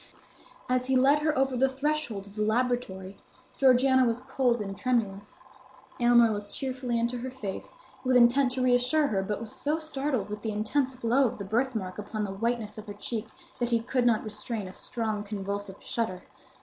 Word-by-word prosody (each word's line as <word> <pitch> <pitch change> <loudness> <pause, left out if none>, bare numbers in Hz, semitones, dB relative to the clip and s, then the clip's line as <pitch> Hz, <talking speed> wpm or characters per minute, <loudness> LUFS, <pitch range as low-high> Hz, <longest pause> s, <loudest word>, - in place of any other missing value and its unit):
As 255 0 +1
he 265 - +2
led 275 +3 +5
her 300 -1 0
over 265 -1 +2
the 265 +2 +3
threshold 270 -7 -2
of 200 0 -14
the 215 - -2
laboratory, 215 -4 -1 0.4
Georgiana 260 0 +5
was 235 -1 +1
cold 255 -2 +1
and 195 -2 -4
tremulous. 205 -4 -2 0.6
Aylmer 240 -1 +6
looked 205 -1 -5
cheerfully 255 -3 -2
into 235 +1 -1
her 255 +2 -4
face, 220 - -6 0.3
with 255 -1 +2
intent 250 +2 +5
to 260 - -1
reassure 250 +5 +3
her, 195 -3 +1
but 205 +1 -3
was 225 -2 -5
so 300 +2 0
startled 280 -8 -2
with 210 0 -6
the 220 - -3
intense 255 +6 0
glow 255 +2 +3
of - - -5
the 200 - -6
birthmark 220 -3 -1
upon 210 +1 -3
the 200 - -3
whiteness 225 0 -2
of 215 - -10
her 205 - -7
cheek 220 +1 -4 0.3
that 240 -1 0
he 235 -1 +3
could 245 +1 +1
not 225 -3 +3
restrain 210 -1 -4
a 185 - -9
strong 220 -3 -3
convulsive 200 -1 -4
shudder. 205 -6 -3
235 Hz, 190 wpm, -28 LUFS, 210-260 Hz, 0.6 s, Aylmer